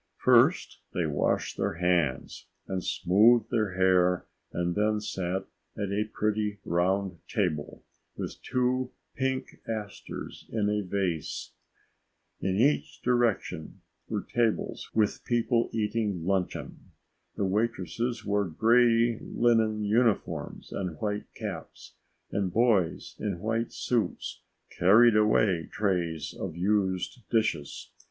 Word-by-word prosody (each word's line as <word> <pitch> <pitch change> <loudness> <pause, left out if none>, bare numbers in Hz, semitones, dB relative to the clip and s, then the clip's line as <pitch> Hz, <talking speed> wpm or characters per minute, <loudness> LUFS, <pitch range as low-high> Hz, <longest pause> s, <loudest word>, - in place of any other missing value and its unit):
First - - +4 0.2
they 85 - +1
washed 75 -2 0
their - - 0
hands 85 -6 0 0.2
and 95 -1 -3
smoothed 110 +5 +4
their 110 -5 +1
hair 90 -1 +3 0.3
and 85 0 -1
then 105 +2 +1
sat 95 -3 -3 0.3
at 100 -2 -2
a 105 +2 0
pretty 105 -1 -1
round 90 +1 0
table 85 -9 -2 0.3
with - - -5
two 125 0 0 0.2
pink 130 0 -2
asters 110 -3 -6
in 105 -2 +1
a 105 0 +1
vase. 90 -5 -2 0.9
In 95 0 -1
every 140 +5 +4 0.2
direction 120 -10 0 0.3
were - - -2
tables 115 -2 -1
with 110 -2 +1
people 120 0 +1
eating 105 -5 -1
luncheon. 95 -1 -2 0.6
The 100 - 0
waitresses 115 +3 -1
wore 100 0 +1
gray 115 +5 +3
linen 110 -3 +2
uniforms 110 +1 0
and 90 -5 -4
white 105 -1 -3
caps, - - -7 0.4
and 95 -3 -1
boys 105 -6 +1
in - - -2
white 115 +3 -1
suits 120 -3 -2 0.3
carried 110 +6 +6
away 105 -5 +3
trays 90 -6 -1
of - - -5
used 95 +3 0
dishes. 85 -11 -1
105 Hz, 115 wpm, -28 LUFS, 90-115 Hz, 0.9 s, carried